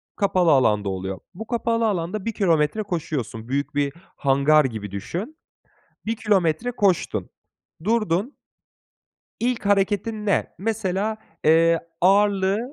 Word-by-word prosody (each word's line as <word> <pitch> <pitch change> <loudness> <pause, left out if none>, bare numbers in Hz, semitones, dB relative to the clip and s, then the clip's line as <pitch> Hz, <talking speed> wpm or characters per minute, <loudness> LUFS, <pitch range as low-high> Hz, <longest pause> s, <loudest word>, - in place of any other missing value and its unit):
kapalı 185 -4 +2
alanda 105 -7 +3
oluyor. 95 0 -4
Bu 220 +5 -8
kapalı 230 -1 0
alanda 190 +1 -2
1 230 - -2
kilometre 170 +1 +1
koşuyorsun, 150 - -4
büyük 140 +3 -2
bir 145 -1 0 0.2
hangar 140 +2 +4
gibi 110 -5 -5
düşün. 185 - -5 0.7
1 225 - -1
kilometre 205 0 +1
koştun, 200 -7 0 0.5
durdun. 215 - 0 1.1
İlk 240 -3 -1
hareketin 205 +2 +1
ne? 200 - +2
Mesela, 215 0 -1 0.3
eee, 165 +1 +5 0.2
ağırlığı 195 +1 +3
190 Hz, 115 wpm, -23 LUFS, 150-215 Hz, 1.1 s, eee